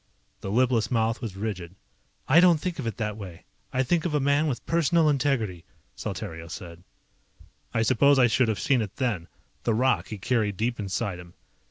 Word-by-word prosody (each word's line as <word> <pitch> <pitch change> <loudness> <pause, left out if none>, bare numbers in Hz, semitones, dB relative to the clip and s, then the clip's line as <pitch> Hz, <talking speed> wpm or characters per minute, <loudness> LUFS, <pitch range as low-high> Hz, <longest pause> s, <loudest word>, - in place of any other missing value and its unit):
The - - -6
lipless 115 0 +2
mouth 115 -1 0
was 110 -6 -5
rigid. 95 -4 -5 0.5
"I 150 +6 +6
don't 175 -3 +6
think 175 0 -4
of 125 - -3
it 115 - -4
that 105 -2 -3
way. 95 -5 -9 0.3
I 130 - +1
think 160 +5 +1
of 165 -4 -1
a - - +3
man 145 +3 +2
with 130 -5 -3
personal 165 0 +3
integrity," 130 - 0 0.3
Saltario 80 0 -6
said. 85 -2 -8 0.9
I 115 - +1
suppose 140 +4 +4
I 130 - +6
should 120 +1 +2
have 110 -4 -1
seen 130 +1 +2
it 105 -2 -5
then, 105 -11 -2 0.3
the 115 - 0
rock 115 -7 +2
he 105 - -6
carried 105 -2 0
deep 115 +2 -1
inside 95 -2 -3
him. 90 0 -13
115 Hz, 190 wpm, -26 LUFS, 100-135 Hz, 0.9 s, I